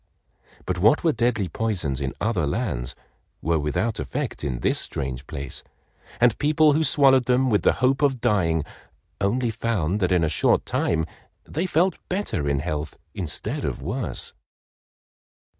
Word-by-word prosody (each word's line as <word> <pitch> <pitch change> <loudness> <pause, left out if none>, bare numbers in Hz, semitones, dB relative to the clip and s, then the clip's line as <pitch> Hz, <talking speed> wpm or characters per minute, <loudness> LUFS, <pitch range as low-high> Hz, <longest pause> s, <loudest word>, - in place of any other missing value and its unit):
But 90 -1 -2
what 110 - +4
were 165 - +4
deadly 120 -5 0
poisons 85 - -2
in 65 -1 -3
other 100 -9 0
lands 70 - -2 0.4
were 80 0 +1
without 75 +10 -1
effect 140 - -4
in 65 -5 -2
this - - +1
strange 65 0 -4
place, 70 -1 -5 0.6
and 120 -2 +5
people 150 0 +4
who 155 +2 +2
swallowed 135 -4 +5
them 125 +1 +2
with 105 - +3
the - - +4
hope 135 +2 +2
of 135 -3 +2
dying, 85 -8 +2 0.6
only 115 +4 +1
found 105 -5 -1
that 90 -2 +1
in 90 -2 +3
a - - +3
short - - +2
time 80 -1 0 0.4
they 170 +5 -2
felt 175 +1 +2
better 180 - -1
in 70 -1 +1
health 75 -2 -4 0.2
instead 85 -6 -3
of - - -2
worse. 100 - -3
105 Hz, 155 wpm, -24 LUFS, 75-130 Hz, 0.6 s, and